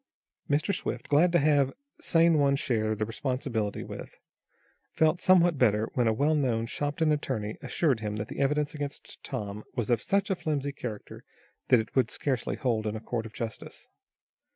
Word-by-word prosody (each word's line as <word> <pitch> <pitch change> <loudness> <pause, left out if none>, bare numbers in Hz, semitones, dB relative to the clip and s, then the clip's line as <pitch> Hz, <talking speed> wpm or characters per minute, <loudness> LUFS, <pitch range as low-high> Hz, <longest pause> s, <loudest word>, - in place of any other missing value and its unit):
Mr. 150 +8 +1
Swift, 120 -9 -4
glad 160 +5 +4
to 175 - +4
have 145 -3 +3 0.3
someone 160 -5 +4
share 110 -5 0
the 110 0 -1
responsibility 115 -3 -2
with, - - -9 0.8
felt 160 +2 +2
somewhat 175 -5 +4
better 110 -2 +2
when 125 -2 +2
a - - +4
well 145 +8 +2
known 125 -6 +1
Shopton 150 +5 -1
attorney 120 -8 -2
assured 140 -9 +1
him 105 -1 -3
that 105 0 -4
the - - -7
evidence 145 +1 +1
against 145 -2 -7
Tom 105 0 -5
was 120 -1 -1
of 115 -2 +2
such 200 - 0
a - - +2
flimsy 145 -4 -2
character 115 -6 -7 0.4
that 125 - +6
it 110 - -5
would 130 -4 +3
scarcely 130 -4 -2
hold 115 -4 -1
in 105 - -2
a - - -4
court 115 0 -3
of 110 - -15
justice. 115 -2 -7
130 Hz, 175 wpm, -28 LUFS, 110-150 Hz, 0.8 s, that